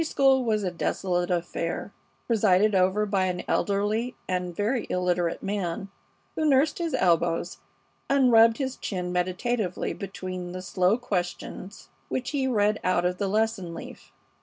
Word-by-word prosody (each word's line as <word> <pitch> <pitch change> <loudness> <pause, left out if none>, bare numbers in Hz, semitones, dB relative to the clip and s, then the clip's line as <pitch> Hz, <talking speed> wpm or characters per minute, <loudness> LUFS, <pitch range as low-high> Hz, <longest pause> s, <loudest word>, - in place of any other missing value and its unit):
The - - 0
Sunday - - -5
school 270 -1 +4
was 215 -3 0
a 185 - -1
desolate 175 0 -1
affair, 175 +2 -2 0.3
presided 210 -2 +3
over 190 +3 +3
by 195 -2 +1
an 180 -1 -2
elderly 210 +4 0
and 180 -1 -2
very 220 +5 -1
illiterate 180 -2 0
man, 195 -1 -3 0.4
who 315 - -2
nursed 280 +4 +3
his 330 -5 -1
elbows 170 -3 +1 0.5
and 270 -2 +4
rubbed 225 0 +6
his 265 -2 -3
chin 180 -3 -3
meditatively 185 +3 -1
between 185 -2 -6
the 185 0 -6
slow 185 +3 +2
questions 195 -2 -5 0.2
which 250 -1 -2
he 275 -3 0
read 210 -3 +2
out 180 -1 +2
of 180 0 -1
the 200 - 0
lesson 210 -4 -1
leaf. - - -10
195 Hz, 155 wpm, -26 LUFS, 180-230 Hz, 0.5 s, rubbed